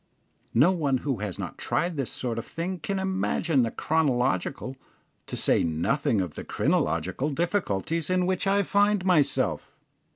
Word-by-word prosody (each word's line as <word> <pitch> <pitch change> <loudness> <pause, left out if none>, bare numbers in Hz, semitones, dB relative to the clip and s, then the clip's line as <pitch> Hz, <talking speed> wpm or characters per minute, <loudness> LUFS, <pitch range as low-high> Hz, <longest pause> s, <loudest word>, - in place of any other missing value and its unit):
No 170 +6 +6
one 145 -7 +1
who 135 -4 0
has 100 -2 -4
not - - -6
tried 175 0 -1
this 135 -4 -2
sort 120 -3 -2
of - - -6
thing 175 +2 -4
can 195 +5 -2
imagine 190 -6 +1
the 115 - +1
chronological, 135 -2 0 0.5
to - - -4
say - - +3
nothing 95 - +1
of 90 -5 -4
the - - -7
crinological, 95 - 0
difficulties 165 - -1
in 185 0 +2
which 185 +1 0
I 200 +1 +3
find 205 0 +2
myself. 175 -6 +2
155 Hz, 155 wpm, -26 LUFS, 120-185 Hz, 0.5 s, No